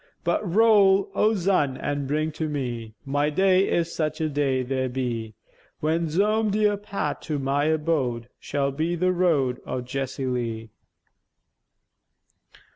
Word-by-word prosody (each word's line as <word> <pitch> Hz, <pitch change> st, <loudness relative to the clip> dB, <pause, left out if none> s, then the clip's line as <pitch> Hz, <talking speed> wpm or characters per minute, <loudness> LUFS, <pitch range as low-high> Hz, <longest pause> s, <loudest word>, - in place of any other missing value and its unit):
But 170 Hz, 0 st, +1 dB
roll, 205 Hz, -3 st, +5 dB
O 220 Hz, +1 st, +2 dB
zun, 175 Hz, -8 st, +1 dB
an' 145 Hz, -1 st, -2 dB
bring 155 Hz, +2 st, 0 dB
to 155 Hz, 0 st, -3 dB
me 120 Hz, -6 st, -4 dB
My 145 Hz, +2 st, +1 dB
day, 190 Hz, +4 st, +3 dB
if 170 Hz, -, +2 dB
such 155 Hz, -2 st, -3 dB
a 160 Hz, -1 st, 0 dB
day 135 Hz, -3 st, 0 dB
there 130 Hz, 0 st, -1 dB
be, 120 Hz, -4 st, -3 dB, 0.4 s
When 165 Hz, +2 st, 0 dB
zome 210 Hz, +6 st, +2 dB
dear 210 Hz, 0 st, +2 dB
path 205 Hz, 0 st, -4 dB
to 155 Hz, -2 st, -3 dB
my 140 Hz, +1 st, 0 dB
abode 150 Hz, -7 st, 0 dB
Shall 140 Hz, -1 st, -1 dB
be 160 Hz, +5 st, -1 dB
the 180 Hz, +2 st, +1 dB
road 155 Hz, -9 st, +1 dB
o' 130 Hz, -, -3 dB
Jessie 135 Hz, +1 st, -4 dB
Lee. 115 Hz, -3 st, -3 dB
150 Hz, 140 wpm, -25 LUFS, 130-180 Hz, 0.4 s, roll